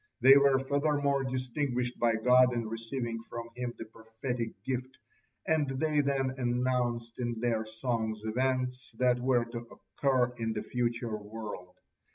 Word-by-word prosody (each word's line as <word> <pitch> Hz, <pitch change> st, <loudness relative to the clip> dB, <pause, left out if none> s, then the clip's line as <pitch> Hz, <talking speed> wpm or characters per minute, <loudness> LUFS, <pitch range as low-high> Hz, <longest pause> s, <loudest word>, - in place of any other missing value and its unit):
They 135 Hz, +1 st, +9 dB
were 140 Hz, -1 st, +5 dB
furthermore 140 Hz, 0 st, +1 dB
distinguished 130 Hz, -1 st, -2 dB
by 115 Hz, -1 st, +3 dB
God 125 Hz, +2 st, +5 dB
in 115 Hz, -2 st, -2 dB
receiving 115 Hz, +1 st, -4 dB
from 115 Hz, 0 st, -6 dB
Him 125 Hz, -1 st, -4 dB
the 115 Hz, -, -6 dB
prophetic 115 Hz, -1 st, -5 dB
gift, 130 Hz, +1 st, -3 dB, 0.5 s
and 155 Hz, -3 st, +2 dB
they 150 Hz, -1 st, +2 dB
then 135 Hz, -2 st, 0 dB
announced 120 Hz, -1 st, 0 dB
in 120 Hz, -2 st, -2 dB
their 115 Hz, -2 st, 0 dB
songs 110 Hz, -1 st, -2 dB
events 125 Hz, +1 st, -1 dB
that 125 Hz, 0 st, +3 dB
were 125 Hz, -1 st, +2 dB
to 115 Hz, 0 st, -6 dB
occur 125 Hz, +1 st, -1 dB
in 115 Hz, -1 st, -1 dB
the 105 Hz, -, -3 dB
future 120 Hz, -2 st, -1 dB
world. 105 Hz, -3 st, -8 dB
125 Hz, 145 wpm, -31 LUFS, 115-130 Hz, 0.5 s, They